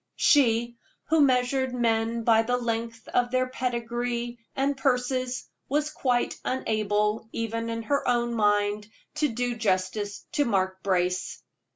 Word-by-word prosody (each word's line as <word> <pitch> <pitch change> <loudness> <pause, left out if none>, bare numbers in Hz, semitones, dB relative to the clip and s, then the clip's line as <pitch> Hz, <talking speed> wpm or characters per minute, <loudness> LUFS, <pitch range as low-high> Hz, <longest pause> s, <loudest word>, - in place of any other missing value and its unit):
She, 240 -7 +3 0.3
who 320 -1 +4
measured 260 -1 +2
men 230 -1 +1
by 225 -1 +5
the 245 +2 0
length 230 -1 -3
of 245 0 +1
their 255 +1 +1
pedigree 240 -1 -3 0.2
and 275 +1 +1
purses, 255 -1 0 0.2
was 295 +2 0
quite 245 -4 0
unable, 215 -3 0
even 230 0 -2
in 230 0 -3
her 280 +5 0
own 240 -1 +1
mind, 205 -1 +1 0.3
to 300 0 +3
do 245 -1 -2
justice 205 -1 -1
to 290 - +2
Mark 190 -5 0
Brace. 180 -1 -1
235 Hz, 135 wpm, -27 LUFS, 220-255 Hz, 0.3 s, by